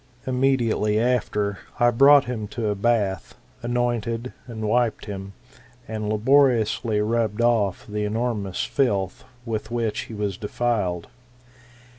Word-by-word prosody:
Immediately 125 -5 +1
after, 105 -5 0 0.2
I 120 -1 +5
brought 140 +4 +6
him 115 -4 -4
to 110 -3 0
a - - +1
bath, 100 -2 0 0.3
anointed, 120 0 -1
and 110 -3 -4
wiped 120 +1 +1
him, 100 -1 -7 0.5
and 110 -1 -3
labor 130 +6 +5
iously 110 -2 0
rubbed 115 -2 0
off 115 -5 +1
the 105 0 -3
enormous 105 -3 -2
filth 100 -9 0 0.2
with 110 -2 -3
which 115 -3 -2
he 110 - -9
was 100 -3 -2
defiled. 105 -6 -1
110 Hz, 125 wpm, -24 LUFS, 105-120 Hz, 0.5 s, brought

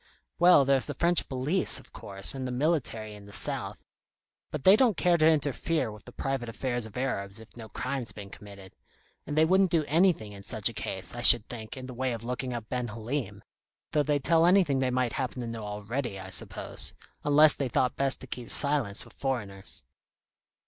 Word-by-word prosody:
"Well, 175 -5 +7
there's 135 -1 +3
the 145 - -4
French 170 +3 +1
police, 140 +8 +1
of - - -18
course, 95 -1 -5
and 130 -1 -4
the - - -4
military 125 -6 -1
in 100 -1 -12
the - - -12
south. - - -1 0.7
But 150 -3 -5
they 190 - +8
don't 230 -5 +3
care 175 -1 +3
to 155 -2 +4
interfere 150 -3 +1
with 105 -1 -13
the 125 - -11
private 135 -2 -3
affairs 120 -1 -2
of 110 - -11
Arabs, 100 -7 -2
if 110 -1 -15
no 115 -2 -9
crime's 130 +3 -3
been 100 -2 -10
committed 100 -2 -12 0.5
and 145 - -4
they 155 - +6
wouldn't 190 +2 +4
do 165 -3 +1
anything 160 - +2
in 100 -1 -10
such 110 +1 0
a - - -9
case, 95 -3 -4
I 120 - -5
should 120 -2 +7
think, 110 0 -8
in 130 - -7
the 130 - -8
way 130 0 -1
of 115 -1 -6
looking 125 +1 -3
up 115 -3 -5
Ben 125 -1 -2
Halim, 115 +2 -5 0.5
though 150 - +2
they'd 145 -1 0
tell 165 +2 +4
anything 175 -7 +4
they 130 -1 +1
might 125 -1 0
happen 130 -1 -3
to 120 - -4
know 115 -1 -6
already, 105 +2 -4
I 95 0 -9
suppose - - -4 0.3
unless 150 +1 +6
they 135 -3 -3
thought 125 +2 +1
best 135 -1 -1
to - - -8
keep 120 -1 -7
silence 140 -9 +3
with - - -17
foreigners." 105 -8 -4
125 Hz, 205 wpm, -28 LUFS, 110-145 Hz, 0.7 s, they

